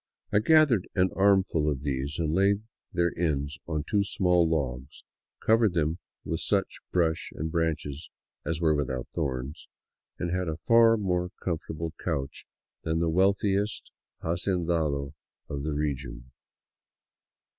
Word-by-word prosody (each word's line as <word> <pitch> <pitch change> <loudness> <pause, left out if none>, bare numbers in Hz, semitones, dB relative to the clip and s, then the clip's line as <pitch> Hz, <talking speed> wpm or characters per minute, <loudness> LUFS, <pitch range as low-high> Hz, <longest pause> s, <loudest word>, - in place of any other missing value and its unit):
I 105 - +6
gathered 140 - +4
an 95 -1 +3
armful 95 -6 +3
of 70 -2 -3
these 70 +1 -2
and 80 -2 0
laid 100 +3 +3 0.3
their 85 -1 +1
ends 75 -1 -1
on 75 -2 -1
two 100 -1 +2
small 90 -3 +2
logs, 70 -4 -3 0.4
covered 110 -4 +4
them 80 +1 0 0.3
with - - -2
such - - 0
brush 85 -2 +1
and 80 +1 -3
branches 80 -3 -2 0.3
as 80 +1 -2
were 80 -2 +3
without 65 -4 -2
thorns, 65 +3 -3 0.5
and 85 - -2
had 90 -1 -1
a 80 0 -2
far 115 +5 +5
more 90 -3 0
comfortable 80 -1 -3
couch 70 -6 -3 0.3
than 80 0 -1
the 85 0 +1
wealthiest 100 +3 +1 0.3
hacendado 85 -5 0 0.3
of 70 -1 -4
the 75 +1 -2
region. 65 -4 -3
80 Hz, 135 wpm, -28 LUFS, 75-95 Hz, 0.5 s, I